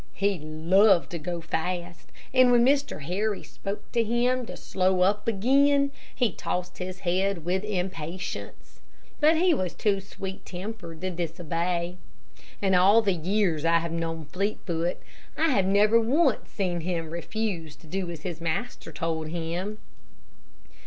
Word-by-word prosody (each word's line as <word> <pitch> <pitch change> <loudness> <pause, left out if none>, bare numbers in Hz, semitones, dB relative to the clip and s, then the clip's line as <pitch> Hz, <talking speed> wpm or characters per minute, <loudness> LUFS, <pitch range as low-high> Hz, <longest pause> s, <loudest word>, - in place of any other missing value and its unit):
He 200 -1 +1
loved 170 +5 +3
to 170 - -4
go 170 +1 -4
fast, 175 +1 -4 0.2
and 255 -1 +6
when 240 -1 +6
Mr. 275 - +1
Harry 200 +6 -1
spoke 200 +1 -7
to 235 - +2
him 240 +2 +1
to - - -7
slow 185 -1 +1
up 200 +3 +2
again, 280 +6 +3 0.2
he 245 -5 +2
tossed 180 0 -4
his 185 +1 -5
head 185 -1 0
with 185 +2 0
impatience. 185 -3 -5 0.4
But 315 +2 +5
he 355 +1 +4
was 185 - -2
too 205 -3 +1
sweet 190 0 -7
tempered 185 -3 -7
to 185 0 -2
disobey. 170 +1 -2 0.7
In 190 -1 +3
all 195 +5 +6
the 200 -2 +2
years 180 -1 +1
that 165 +1 +3
I - - +7
have 170 0 -4
known 165 -1 -3
Fleetfoot, 175 -1 -2 0.4
I 325 +1 +3
have 195 -7 +2
never 210 +3 +5
once 270 +3 +2
seen 180 -4 -1
him 165 -2 -3
refuse 170 -3 -3
to 150 - -19
do 185 +2 -3
as 165 -3 -7
his 170 -3 -5
master 170 +3 -3
told 160 0 -2
him. 175 +5 -3
185 Hz, 150 wpm, -27 LUFS, 170-215 Hz, 0.7 s, I